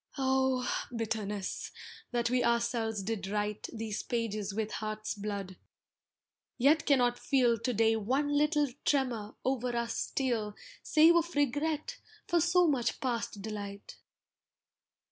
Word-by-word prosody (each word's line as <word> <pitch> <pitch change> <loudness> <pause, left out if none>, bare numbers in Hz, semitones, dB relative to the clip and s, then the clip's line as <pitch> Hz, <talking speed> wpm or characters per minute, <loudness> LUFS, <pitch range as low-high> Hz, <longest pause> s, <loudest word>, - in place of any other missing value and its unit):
Oh! 265 -1 +1 0.3
bitterness, 210 -3 -3 0.4
that 240 -1 0
we 250 -1 +2
ourselves 235 -3 0
did 200 -1 -3
write 210 +1 -2
These 220 -2 -4
pages 215 -4 -2
with 215 +1 -2
heart's 215 0 -3
blood, 200 -2 -5 1.0
yet 295 +5 +4
cannot 245 -4 +3
feel 250 -4 +3
To 250 - -1
day 225 0 +3
one 260 +7 0
little 295 0 +3 0.2
tremor 245 -7 0
o'er 250 -2 0
us 235 0 -1
steal 230 -6 -1 0.3
Save 325 +2 +6
of 340 0 -1
regret 295 - 0 0.3
for 345 - +3
so 350 +2 +4
much 270 -7 +1
past 230 -5 -2
delight! 200 -2 -6
235 Hz, 125 wpm, -31 LUFS, 215-270 Hz, 1.0 s, Save